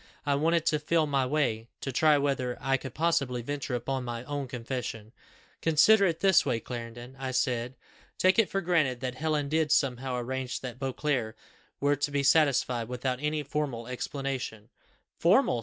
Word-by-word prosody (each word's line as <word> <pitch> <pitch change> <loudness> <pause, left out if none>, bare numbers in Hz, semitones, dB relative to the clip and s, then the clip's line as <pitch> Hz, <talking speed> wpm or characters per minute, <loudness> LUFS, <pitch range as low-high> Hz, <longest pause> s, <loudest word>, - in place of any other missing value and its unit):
I 145 - +2
wanted 165 +3 +2
to 155 -2 +2
feel 160 +1 +2
my 135 -3 +1
way, 125 -6 0
to 135 - -3
try 150 +3 +4
whether 135 -3 -1
I 135 0 +1
could 130 -1 -6
possibly 140 -7 0
venture 140 -1 -3
upon 130 +2 -2
my 120 -1 -5
own 145 0 -4
confession. 115 -3 -5 0.5
'Consider 195 +6 +5
it 165 -2 -2
this 190 -3 +5
way, 125 -5 0
Clarendon,' 120 +2 -8
I 135 -1 -3
said. 125 -1 -1 0.4
'Take 185 +3 +4
it 220 - +4
for 195 - -1
granted 155 -9 +1
that 130 -1 -2
Helen 150 +1 -1
did 155 0 +1
somehow 130 -3 +1
arrange 130 +1 -3
that 125 -1 -7
Beauclerc 130 -4 -2 0.4
were 145 +1 +2
to 145 +1 -1
be 140 -1 0
satisfied 135 -6 +3
without 125 +1 -2
any 150 0 -1
formal 140 -5 -3
explanation.' 125 -3 -4 0.5
'Formal! 120 - +4
135 Hz, 170 wpm, -29 LUFS, 125-150 Hz, 0.5 s, Consider